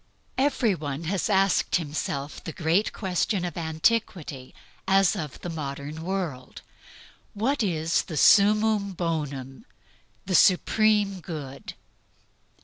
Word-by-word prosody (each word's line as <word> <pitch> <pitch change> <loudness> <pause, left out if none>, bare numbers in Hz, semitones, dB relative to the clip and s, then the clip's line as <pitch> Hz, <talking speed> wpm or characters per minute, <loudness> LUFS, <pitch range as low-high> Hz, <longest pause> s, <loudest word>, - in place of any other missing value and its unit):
Every 265 -6 +2
one 150 -2 -5
has 190 +6 -1
asked 195 -2 +2
himself 145 -3 -3
the - - -5
great 170 +6 +1
question 185 -1 -1
of 175 - -5
antiquity 160 - -1 0.3
as 195 -1 +4
of 150 -4 -6
the 175 - -5
modern 145 0 -6
world: 170 -8 -4 0.7
What 255 +7 0
is 165 -5 +1
the 160 - -7
summum 210 +2 +4
bonum 150 - -4 0.6
the 190 - -3
supreme 205 +2 +3
good? 150 -6 -8
175 Hz, 110 wpm, -26 LUFS, 155-200 Hz, 0.7 s, as